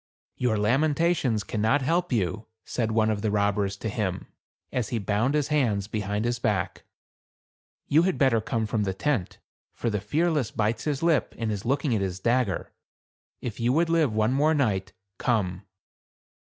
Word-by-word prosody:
"Your 120 -3 +1
lamentations 135 +1 +2
cannot 110 +7 +1
help 170 +4 +1
you," 110 -1 -1 0.2
said 115 -3 -1
one 110 0 +2
of 105 -1 -2
the 110 - 0
robbers 100 -1 0
to 110 - -4
him, 100 -4 -2 0.5
as 125 -4 -1
he 120 - -1
bound 110 +6 0
his 150 -1 +1
hands 115 -10 +1
behind 105 0 -2
his 120 0 -1
back. 105 -6 -1 1.0
"You 155 +3 +4
had 185 +1 +1
better 130 -5 +3
come 110 +1 -1
from 110 0 -1
the 95 -2 -1
tent; 110 -2 -1 0.4
for 115 - -1
the 105 -2 -1
Fearless 150 +3 +1
bites 110 +1 -1
his 150 -1 -1
lip, 165 -5 +2
and 115 -2 -1
is 100 0 -4
looking 135 +1 +1
at 105 - +1
his 95 -1 -2
dagger. 115 -3 0 0.7
If 120 -2 -5
you 120 +2 +2
would 165 +2 +2
live 160 -6 +3
one 110 +3 +1
more 150 +4 +3
night, 105 -9 0 0.3
come." 100 -5 0
115 Hz, 170 wpm, -26 LUFS, 105-140 Hz, 1.0 s, You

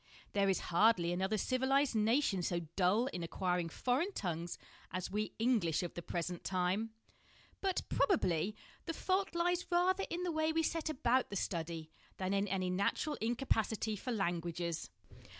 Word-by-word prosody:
There 200 -1 +3
is 190 - +1
hardly 175 -3 +4
another 190 +4 0
civilised 265 +4 +2
nation 220 -2 +2
so 175 0 0
dull 200 +6 +3
in 180 - -3
acquiring 180 0 -1
foreign 260 - 0
tongues 175 - -3 0.3
as 185 0 -4
we 210 +1 -2
English 220 -9 +2
of 175 - -4
the 175 - -5
present 175 +1 -3
time; 185 +4 0 0.7
but, 385 -2 0
probably, 200 - +2 0.3
the 330 - -2
fault 380 -1 0
lies 350 +1 +1
rather 370 +2 +3
in 350 +1 -2
the 355 - 0
way 315 0 +1
we 325 0 +1
set 320 0 -1
about 255 -3 +2
the 200 - -5
study 165 -4 -3 0.3
than 190 +1 -1
in 200 +1 +1
any 185 -1 0
natural 200 +11 0
incapacity 225 -2 0
for 250 +5 -4
languages. 170 -4 -2
205 Hz, 155 wpm, -35 LUFS, 180-270 Hz, 0.7 s, hardly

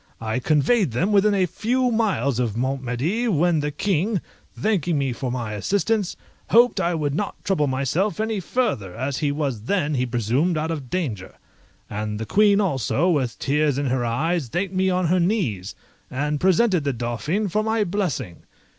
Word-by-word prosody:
I 110 +2 -2
conveyed 155 - +2
them 180 - +1
within 205 0 +4
a 190 -2 +3
few 245 +8 0
miles 185 - +1
of 115 -3 -1
Mont 130 +2 -1
Medi, 145 - -1
when 175 -4 +2
the 150 0 -1
King, 190 +6 0 0.4
thanking 180 -7 +1
me 135 -3 0
for 125 +1 -4
my 120 -4 -3
assistance, 200 - 0 0.3
hoped 240 +2 +5
I 170 0 +1
would 145 -3 -1
not 200 +7 -3
trouble 165 -7 +1
myself 140 +11 0
any 220 -1 -1
farther, 160 - -1
as 130 +3 -2
he 145 -2 +1
was 140 -7 -3
then, 155 -3 0
he 125 -2 0
presumed, 125 - 0
out 160 +2 -1
of 145 -6 -5
danger; 120 - -3 0.5
and 105 0 -4
the 110 - -3
Queen 205 - +4
also, 170 - +1
with 130 -7 0
tears 145 0 +1
in 140 -2 0
her 130 -1 0
eyes, 145 +6 0
thanked 185 - -2
me 190 0 +2
on 185 0 +1
her 180 +3 +2
knees, 170 - -1 0.3
and 145 +2 -1
presented 190 -1 +3
the 140 -1 0
Dauphin 125 - -2
for 210 +4 0
my 220 0 +1
blessing. 170 - -2
155 Hz, 180 wpm, -23 LUFS, 130-195 Hz, 0.5 s, hoped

